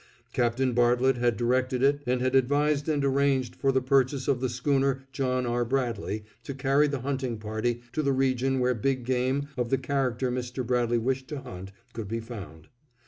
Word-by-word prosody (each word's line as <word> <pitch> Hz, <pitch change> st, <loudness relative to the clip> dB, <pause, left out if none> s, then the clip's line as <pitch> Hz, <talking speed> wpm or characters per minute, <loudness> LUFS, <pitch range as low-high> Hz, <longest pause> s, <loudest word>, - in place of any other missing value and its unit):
Captain 125 Hz, +2 st, +1 dB
Bartlett 120 Hz, +2 st, +3 dB
had 120 Hz, -1 st, +1 dB
directed 125 Hz, +1 st, +1 dB
it 140 Hz, +1 st, +3 dB
and 125 Hz, 0 st, +1 dB
had 130 Hz, 0 st, +1 dB
advised 145 Hz, +3 st, +2 dB
and 145 Hz, -2 st, +1 dB
arranged 135 Hz, -2 st, +1 dB
for 135 Hz, -, +1 dB
the 130 Hz, -1 st, +1 dB
purchase 135 Hz, 0 st, +2 dB
of 135 Hz, -3 st, +1 dB
the 130 Hz, -, 0 dB
Schooner 135 Hz, +1 st, 0 dB
John 130 Hz, -1 st, -1 dB
R. 120 Hz, 0 st, 0 dB
Bradley 115 Hz, -4 st, -2 dB, 0.2 s
to 135 Hz, +3 st, -6 dB
carry 140 Hz, +2 st, +3 dB
the 140 Hz, -3 st, -3 dB
hunting 130 Hz, -3 st, -2 dB
party 110 Hz, +3 st, -2 dB
to 155 Hz, -, 0 dB
the 140 Hz, -2 st, +1 dB
region 135 Hz, 0 st, +1 dB
where 125 Hz, 0 st, +2 dB
big 130 Hz, +2 st, -1 dB
game 130 Hz, +3 st, 0 dB
of 125 Hz, -2 st, -1 dB
the 135 Hz, -, +2 dB
character 130 Hz, -3 st, -1 dB
Mr. 125 Hz, 0 st, -3 dB
Bradley 120 Hz, -1 st, +1 dB
wished 130 Hz, +3 st, -1 dB
to 145 Hz, -3 st, -5 dB
hunt 95 Hz, -2 st, -9 dB, 0.2 s
could 115 Hz, -3 st, -5 dB
be 115 Hz, +3 st, -2 dB
found. 100 Hz, -9 st, -9 dB
130 Hz, 190 wpm, -27 LUFS, 120-135 Hz, 0.2 s, Bartlett